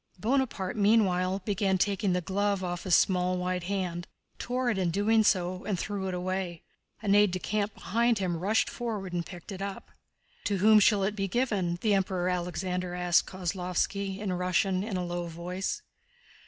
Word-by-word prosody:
Bonaparte 225 Hz, -3 st, 0 dB
meanwhile 195 Hz, -3 st, +3 dB
began 195 Hz, -2 st, +1 dB
taking 200 Hz, +1 st, +1 dB
the 180 Hz, 0 st, +1 dB
glove 200 Hz, +1 st, 0 dB
off 175 Hz, -1 st, -4 dB
his 180 Hz, -3 st, +4 dB
small 180 Hz, -1 st, +2 dB
white 180 Hz, -1 st, -2 dB
hand, 180 Hz, -3 st, -3 dB, 0.3 s
tore 250 Hz, 0 st, 0 dB
it 200 Hz, -, -1 dB
in 180 Hz, -2 st, +1 dB
doing 215 Hz, +5 st, +3 dB
so, 185 Hz, -2 st, +1 dB
and 200 Hz, -3 st, -1 dB
threw 195 Hz, +1 st, -3 dB
it 185 Hz, -, -3 dB
away. 180 Hz, -2 st, -3 dB, 0.4 s
An 200 Hz, -2 st, +2 dB
aide 205 Hz, 0 st, +6 dB
de 185 Hz, -, -2 dB
camp 205 Hz, +2 st, -2 dB
behind 235 Hz, +2 st, +1 dB
him 185 Hz, -3 st, -1 dB
rushed 205 Hz, +6 st, +1 dB
forward 210 Hz, -7 st, -4 dB
and 175 Hz, -1 st, -1 dB
picked 175 Hz, +2 st, -10 dB
it 195 Hz, -1 st, -6 dB
up. 200 Hz, -1 st, -6 dB, 0.5 s
"To 200 Hz, -1 st, +1 dB
whom 215 Hz, +3 st, +6 dB
shall 205 Hz, -1 st, +4 dB
it 205 Hz, +2 st, 0 dB
be 195 Hz, -1 st, -1 dB
given?" 195 Hz, -6 st, 0 dB
the 215 Hz, -2 st, +2 dB
Emperor 185 Hz, -2 st, 0 dB
Alexander 180 Hz, 0 st, -2 dB
asked 180 Hz, -1 st, +2 dB
Kozlóvski, 190 Hz, +1 st, -2 dB
in 200 Hz, -2 st, -2 dB
Russian 185 Hz, +1 st, +1 dB
in 205 Hz, -3 st, -3 dB
a 180 Hz, -, -2 dB
low 175 Hz, 0 st, -3 dB
voice. 175 Hz, +3 st, -4 dB
190 Hz, 180 wpm, -29 LUFS, 180-205 Hz, 0.5 s, aide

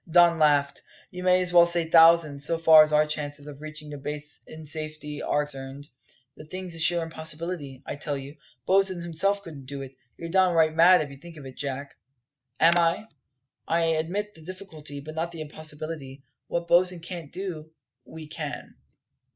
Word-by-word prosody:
Don 170 Hz, 0 st, +5 dB
laughed. 145 Hz, -2 st, +3 dB, 0.3 s
"You 180 Hz, -, -7 dB
may 185 Hz, 0 st, +4 dB
as 180 Hz, 0 st, 0 dB
well 170 Hz, -1 st, +7 dB
say 170 Hz, -1 st, +1 dB
thousands, 165 Hz, -3 st, +5 dB
so 165 Hz, +2 st, 0 dB
far 160 Hz, -1 st, +8 dB
as 155 Hz, 0 st, +4 dB
our 150 Hz, 0 st, +4 dB
chances 145 Hz, -1 st, -4 dB
of 145 Hz, -1 st, -10 dB
reaching 155 Hz, -1 st, -8 dB
the 145 Hz, -, -7 dB
base 150 Hz, +1 st, -4 dB
in 155 Hz, 0 st, -10 dB
safety 155 Hz, -1 st, -4 dB
are 150 Hz, -, 0 dB
concerned.. 135 Hz, 0 st, -9 dB, 0.5 s
The 155 Hz, -, -12 dB
thing's 185 Hz, +2 st, -6 dB
a 165 Hz, -, -4 dB
sheer 170 Hz, +1 st, +2 dB
impossibility, 160 Hz, -3 st, -5 dB
I -, -, -5 dB
tell 145 Hz, 0 st, -3 dB
you; 140 Hz, +2 st, -9 dB, 0.3 s
Bosin 190 Hz, -1 st, +2 dB
himself 195 Hz, +5 st, 0 dB
couldn't 145 Hz, -7 st, -10 dB
do 140 Hz, 0 st, -6 dB
it. 135 Hz, 0 st, -11 dB, 0.2 s
You're 165 Hz, -, -7 dB
downright 170 Hz, -4 st, +3 dB
mad 170 Hz, -1 st, +6 dB
to 140 Hz, -1 st, -11 dB
think 165 Hz, +3 st, -12 dB
of 145 Hz, -, -10 dB
it, 130 Hz, -, -10 dB
Jack." 140 Hz, 0 st, -4 dB, 0.7 s
"Am 165 Hz, +1 st, +6 dB
I? 170 Hz, +6 st, +1 dB, 0.6 s
I 170 Hz, +1 st, +2 dB
admit 165 Hz, +6 st, -1 dB
the 160 Hz, -, -16 dB
difficulty, 160 Hz, -5 st, -8 dB
but 155 Hz, +2 st, -9 dB
not 165 Hz, +2 st, -3 dB
the 165 Hz, -2 st, -7 dB
impossibility. 150 Hz, -2 st, -7 dB, 0.2 s
What 170 Hz, 0 st, -3 dB
Bosin 180 Hz, +1 st, +4 dB
can't 165 Hz, -3 st, -7 dB
do, 175 Hz, -5 st, -6 dB, 0.3 s
we 160 Hz, +3 st, -10 dB
can." 150 Hz, -1 st, -6 dB
160 Hz, 180 wpm, -26 LUFS, 150-170 Hz, 0.7 s, far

